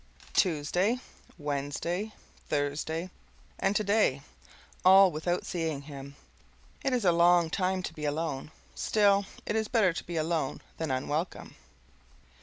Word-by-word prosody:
Tuesday 180 +7 +2 0.4
Wednesday 150 +7 -2 0.4
Thursday 155 +4 -1 0.5
and 195 - +1
today: 205 -10 +2 0.6
all 190 0 +8
without 175 +3 -1
seeing 160 -5 -2
him. 140 -1 -9 0.7
It 270 - +1
is 245 -5 0
a 175 - +6
long 170 -1 +4
time 185 0 0
to 170 - -4
be 150 -2 -5
alone; 150 -2 -2 0.2
still, 200 -2 +3 0.2
it 210 - -1
is 220 -1 0
better 210 -7 +3
to - - -5
be 170 -1 -5
alone 160 -3 -1 0.2
than 160 -2 -2
unwelcome. 145 +6 -2
170 Hz, 125 wpm, -29 LUFS, 150-195 Hz, 0.7 s, all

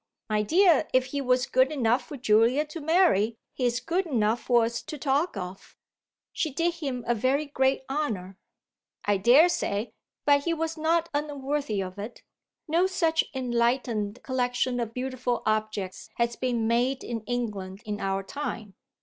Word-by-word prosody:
"My 210 0 +2
dear, 340 - +4
if 255 0 +4
he 285 - 0
was 250 -1 +2
good 260 +2 +3
enough 245 -3 +1
for 290 - -7
Julia 235 +4 +3
to 310 +2 -8
marry 290 - +3 0.2
he's 245 -1 0
good 340 +8 -1
enough 230 -5 +1
for 240 -2 +3
us 235 +1 -3
to 305 - -7
talk 280 - 0
of." 185 0 -8 0.6
"She 315 - -1
did 335 +5 0
him 270 -7 -4
a 240 - +2
very 260 +6 +1
great 265 -2 +1
honour." 215 -10 -3 0.7
"I 205 -1 +3
daresay, 235 - +3 0.3
but 285 -1 +4
he 335 -1 +1
was 325 0 -2
not 330 +1 +1
unworthy 285 -7 -2
of 185 +1 -8
it. 215 +4 -8 0.4
No 335 +4 +3
such 330 -4 +1
enlightened 240 -3 0
collection 250 -1 0
of 230 -2 -2
beautiful 250 -1 -2
objects 215 -3 -2
has 235 0 0
been 240 -3 -1
made 245 +3 +1
in 230 -2 -4
England 210 -5 -4
in 210 -1 -4
our 195 0 -1
time." 220 -4 -5
250 Hz, 160 wpm, -27 LUFS, 220-290 Hz, 0.7 s, dear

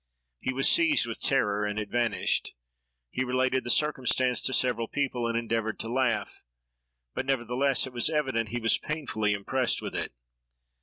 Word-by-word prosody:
He - - -2
was 135 +1 +2
seized 325 -3 +4
with 115 -1 -7
terror, 105 0 +1
and 105 0 -2
it 105 -1 -5
vanished. 120 -1 0 0.6
He 130 - -1
related 130 +1 +1
the 120 - -6
circumstance 130 -3 +2
to - - +1
several 125 -3 +1
people, 125 -4 -1
and 115 0 -1
endeavored 115 -1 -2
to 115 +1 -5
laugh, 120 -6 -1 0.7
but, 130 - -4
nevertheless, 135 +1 +1
it 130 - -9
was 120 +4 +2
evident 130 -8 -1
he 120 - -3
was 115 -1 +3
painfully 125 -9 -2
impressed 125 +5 0
with - - -6
it. - - -3
125 Hz, 165 wpm, -28 LUFS, 115-130 Hz, 0.7 s, seized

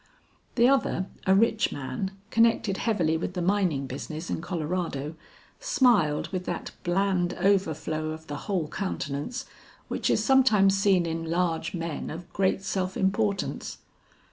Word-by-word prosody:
The 240 0 +5
other, 265 -8 +2 0.2
a 190 - +6
rich 220 +1 +3
man, 135 +7 -3 0.2
connected 225 -4 +3
heavily 170 -8 +1
with 175 +3 -4
the 180 - -1
mining 180 -7 +1
business 155 +5 -6
in - - -2
Colorado, 165 -4 -3 0.5
smiled 200 - +3
with 185 -2 -4
that 175 - -4
bland 180 0 +1
overflow 160 -5 0
of 160 0 -7
the 145 - -5
whole 180 -6 0
countenance 185 - -4 0.4
which - - -1
is - - +2
sometimes 220 -8 +5
seen 195 -3 +3
in 165 0 -3
large 170 0 0
men 165 -3 -4
of 170 +2 -8
great 190 0 +1
self 190 -1 -2
importance. 200 0 -1
180 Hz, 140 wpm, -27 LUFS, 160-200 Hz, 0.5 s, a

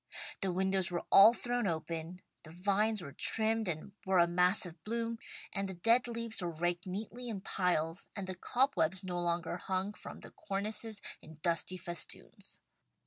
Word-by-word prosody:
The 190 - +1
windows 190 0 +1
were 175 -1 -2
all 200 +3 +10
thrown 245 -3 0
open, 165 +1 -3 0.2
the 155 - -12
vines 200 +4 +2
were 140 - -7
trimmed, 225 +3 +2
and 170 +3 -3
were 190 0 +2
a 170 - +7
mass 180 +3 +4
of 165 -2 -10
bloom, 230 +3 -2 0.4
the 195 -1 -2
dead 230 +8 +4
leaves 230 -2 -3
were 175 - -1
raked 175 +2 -1
neatly 225 +6 -5
in 205 -4 -4
piles 175 -2 0
and 200 -3 -3
the 185 - -4
cobwebs 190 - +1
no 180 -1 -2
longer 170 0 0
hung 190 +2 -2
from - - -10
the - - -10
cornices 210 +2 -2 0.2
in 160 -1 -13
dusty 175 +1 0
festoons. 175 -2 -4
190 Hz, 165 wpm, -33 LUFS, 175-215 Hz, 0.4 s, all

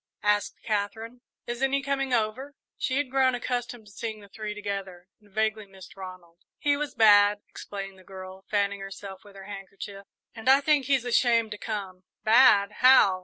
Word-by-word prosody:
asked 210 -1 +1
Katherine. 220 +3 -3 0.2
"Isn't 265 +3 -1
he 275 0 +1
coming 275 -1 -1
over?" 245 +5 -1 0.2
She 260 - -2
had 285 -3 -1
grown 260 -1 +3
accustomed 245 -1 -4
to 205 - -16
seeing 220 +1 -5
the 200 - -14
three 215 0 -6
together, 195 -3 -5
and 210 -1 -24
vaguely 215 0 -1
missed 190 -2 -14
Ronald. 185 -3 -11 0.2
"He 290 -1 +2
was 295 0 -4
bad," 205 -1 +6
explained 195 -1 -8
the - - -17
girl, 190 0 -10
fanning 200 -1 0
herself 195 0 -9
with 205 -1 -16
her 195 -1 -11
handkerchief, 200 0 -9 0.3
"and 225 +2 -2
I 270 +1 +7
think 285 -1 +2
he's 265 -2 +1
ashamed 235 -2 +2
to 210 - -6
come." 195 -4 -5 0.2
"Bad 215 -3 +6
how?" 250 -7 +6
210 Hz, 175 wpm, -27 LUFS, 195-245 Hz, 0.3 s, I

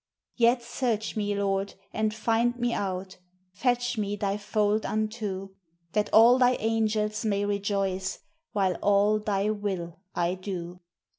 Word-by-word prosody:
Yet 240 0 +3
search 235 -2 -2
me, 205 -1 -1
Lord, 195 0 -1 0.2
and 215 0 +1
find 230 +2 +1
me 240 -1 0
out! 190 -1 -3 0.4
Fetch 245 +3 0
me 205 0 -1
Thy 200 -1 -1
fold 210 +1 0
unto, 215 -3 -2 0.4
That 210 +2 0
all 235 +3 +7
Thy 250 0 +5
angels 215 -1 0
may 205 -2 +1
rejoice, 195 -2 -1 0.3
While 190 -3 +1
all 205 +1 +3
Thy 205 0 0
will 190 -5 -4 0.2
I 175 0 +1
do. 180 -2 -6
210 Hz, 135 wpm, -27 LUFS, 195-220 Hz, 0.4 s, all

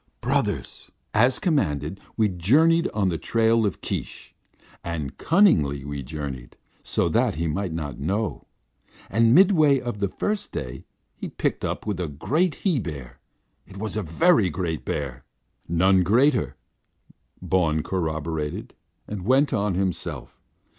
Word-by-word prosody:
"Brothers! - - -2 0.2
As 125 +4 +4
commanded, 95 - 0 0.2
we 110 -2 +4
journeyed 150 - +3
on 100 -3 +1
the 85 - -2
trail 115 -1 +2
of 100 - -5
Keesh, - - -5 0.5
and 80 -5 -4
cunningly 75 - +3
we 70 0 -4
journeyed, 65 -3 -7 0.2
so - - 0
that - - +2
he 85 +2 -2
might 95 +3 -2
not 75 -5 -5
know. 100 +7 -2 0.6
And 115 +3 +4
midway 155 -7 +5
of 120 -4 -5
the 100 - +1
first 205 - -3
day 65 +1 -6 0.3
he - - -7
picked - - -2
up - - -3
with 105 -4 -2
a 90 - -1
great 150 - 0
he 175 -8 +3
bear. 75 - -7 0.5
It 95 - -12
was 110 +1 -4
a 110 - 0
very 105 - +3
great 85 -2 -3
bear." 70 -3 -4 0.4
"None 95 +3 +4
greater," 120 - +2 0.8
Bawn 80 -4 +1
corroborated, 80 -4 -3 0.3
and 105 -3 -5
went 135 +7 +3
on 100 -3 0
himself. 95 -1 -3
95 Hz, 140 wpm, -24 LUFS, 80-120 Hz, 0.8 s, midway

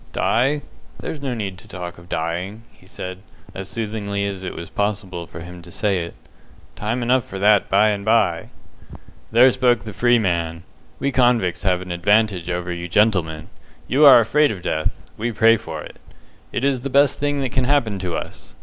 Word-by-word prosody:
"Die! 140 +5 +1 0.3
There's 150 - -6
no 135 -3 -2
need 100 -5 -5
to - - -16
talk 90 -1 -7
of 85 0 -17
dying," 90 +7 -3
he - - -22
said, 90 0 -7 0.3
as 95 0 -7
soothingly 105 -3 -3
as 100 -2 -4
it 95 - -5
was 85 - -7
possible 100 -4 -3
for - - -9
him 90 +1 -10
to 85 - -14
say 100 +1 0
it. 85 - -9 0.6
"Time 115 +4 -2
enough 125 +1 +2
for 95 - -8
that 105 +1 +3
by 105 +3 +4
and 100 -1 -2
by." 100 -6 +2 0.8
"There 125 +3 +6
spoke 125 -2 +2
the 110 -3 -7
free 120 +4 +3
man. 85 -5 -1 0.3
We 140 - -1
convicts 120 -8 +2
have 90 -2 +1
an 90 - -8
advantage 100 0 +2
over 90 0 -2
you 85 0 -5
gentlemen. 90 -5 +1 0.4
You 140 +4 +3
are 135 - +10
afraid 145 +7 +3
of 95 -5 -6
death; 80 0 -2
we 120 +2 -2
pray 115 +1 +5
for 80 -7 -6
it. - - -12 0.5
It 135 - -1
is 135 -3 +1
the 140 - -4
best 140 0 +3
thing 145 0 0
that 130 -2 -2
can 130 -1 +1
happen 125 -8 +1
to 90 -3 -3
us. - - -7
105 Hz, 195 wpm, -21 LUFS, 90-120 Hz, 0.8 s, are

